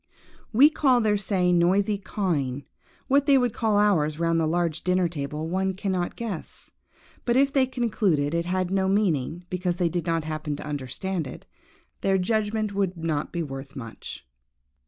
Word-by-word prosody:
We 275 +7 +7
call 265 -5 +3
their 215 -2 +2
say 190 -3 +1
noisy 195 +4 +2
cawing; 145 -10 -2 0.4
what 280 +1 +3
they 280 -1 +6
would 245 -3 +1
call 220 -2 +1
ours 160 -8 +2
round 165 0 +1
the 160 - +1
large 165 -1 0
dinner 180 0 +2
table 150 -1 -4
one 190 +2 -1
cannot 190 -2 -2
guess; 215 -9 -6 0.5
but, 240 0 +2
if 275 +1 +3
they 265 -2 +3
concluded 205 - 0
it 170 0 0
had 185 0 -1
no 190 -1 +1
meaning, 175 -5 0
because 180 -1 -1
they 175 -1 +1
did 175 0 -3
not 165 -1 +1
happen 155 -1 -3
to - - -8
understand 150 +5 -3
it, - - -10 0.6
their 195 0 +2
judgment 215 +2 0
would 195 -3 -1
not 160 -3 -2
be 170 -1 -2
worth 135 -1 -8
much. 115 - -8
180 Hz, 170 wpm, -25 LUFS, 160-210 Hz, 0.6 s, We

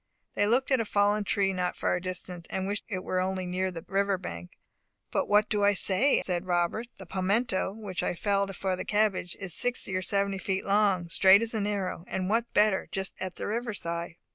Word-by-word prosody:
They 205 - +1
looked 255 +5 +2
at 260 - +4
a - - +1
fallen 205 0 +2
tree 195 -1 +1
not 180 -1 -1
far - - 0
distant, 180 -1 -6
and 190 - -2
wished 205 +1 -3
it 185 -4 -4
were 185 - -1
only 185 0 -1
near 185 +1 -1
the 165 -3 -8
river 200 0 +1
bank. 90 - -8 0.5
"But - - 0
what 210 +1 +4
do 205 -1 0
I 205 0 +5
say?" 200 +8 +3
said 180 0 -2
Robert. 175 +6 0
"The 190 - -10
palmetto, 190 +2 0
which 205 -5 -4
I - - -1
felled 200 +1 0
for 190 0 -1
the - - -5
cabbage, 205 -4 0
is 195 -4 -3
sixty 245 -5 0
or 185 - 0
seventy 200 +1 0
feet 190 0 -2
long, 200 -3 +2
straight 190 +5 +6
as 230 - +1
an 210 -2 0
arrow, 195 -4 -2
and 190 +1 -2
what 230 +1 +2
is - - -45
better, 210 -2 +3
just 190 0 -2
at 185 -1 -4
the - - -5
river 230 +1 -2
side." 170 -2 -4
195 Hz, 215 wpm, -28 LUFS, 185-210 Hz, 0.5 s, straight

